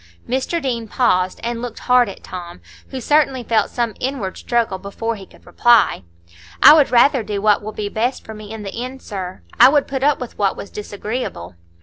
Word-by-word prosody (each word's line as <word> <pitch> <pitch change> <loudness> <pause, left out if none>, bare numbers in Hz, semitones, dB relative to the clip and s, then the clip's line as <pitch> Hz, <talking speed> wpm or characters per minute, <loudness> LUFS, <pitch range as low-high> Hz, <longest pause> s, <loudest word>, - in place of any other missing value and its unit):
Mr 265 +7 -1
Deane 240 -6 -3
paused 185 -6 +1
and 235 0 -3
looked 240 -2 -6
hard 250 -3 +3
at 195 - -11
Tom, 175 - -8 0.3
who 265 - -6
certainly 270 -1 +2
felt 225 -1 +1
some 235 -3 -2
inward 250 -8 -3
struggle 230 -6 -1
before 225 +4 -4
he 195 -3 -11
could - - -21
reply. 235 - +3 0.6
"I - - +11
would 300 -3 +4
rather 255 +2 +4
do 210 -2 -4
what 210 0 +3
will 215 +1 -6
be 210 -1 -4
best 230 +5 -2
for 220 - -8
me 215 -1 -10
in 220 -1 -7
the 195 - -6
end, 260 +1 -8
sir; 185 - -7 0.2
I - - +9
would 290 0 +2
put 270 -1 -3
up 285 0 +2
with 250 -2 -8
what 200 -2 +1
was 200 - -8
disagreeable." 210 - -5
230 Hz, 205 wpm, -19 LUFS, 205-255 Hz, 0.6 s, I